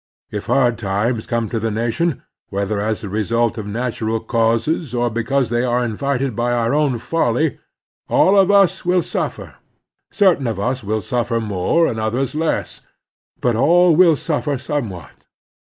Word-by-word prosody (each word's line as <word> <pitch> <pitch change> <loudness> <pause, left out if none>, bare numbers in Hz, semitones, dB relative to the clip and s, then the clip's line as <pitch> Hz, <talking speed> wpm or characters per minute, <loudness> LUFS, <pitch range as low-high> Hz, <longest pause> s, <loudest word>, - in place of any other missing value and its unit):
If 105 -1 -5
hard 120 -4 +2
times 110 +3 -1
come 115 -1 -1
to 115 - -2
the 115 +1 -1
nation, 120 +8 -1 0.3
whether 100 +1 -2
as 110 0 -2
the 105 - -6
result 115 +3 0
of 105 - -6
natu 115 +1 -3
ral 115 0 0
causes 115 +5 0
or 120 0 0
because 120 +3 0
they 120 +1 +1
are 125 0 +1
invited 135 +2 -2
by 120 +2 0
our 115 +1 0
own 145 -4 +1
folly, 140 +2 0 0.5
all 195 - +4
of 195 -1 +5
us 195 -2 +4
will 180 -1 +2
suffer. - - -4 0.5
Certain 180 - +2
of 110 -4 -3
us 125 +4 -2
will 110 +2 -1
suffer 120 +2 -1
more, 105 - +1
and 115 -7 -2
others 120 +5 -1
less, 160 +1 -2 0.6
but 120 -2 +1
all 170 +7 +4
will 170 -2 +6
suffer 145 -1 -2
somewhat. 120 - -6
120 Hz, 165 wpm, -19 LUFS, 110-145 Hz, 0.6 s, will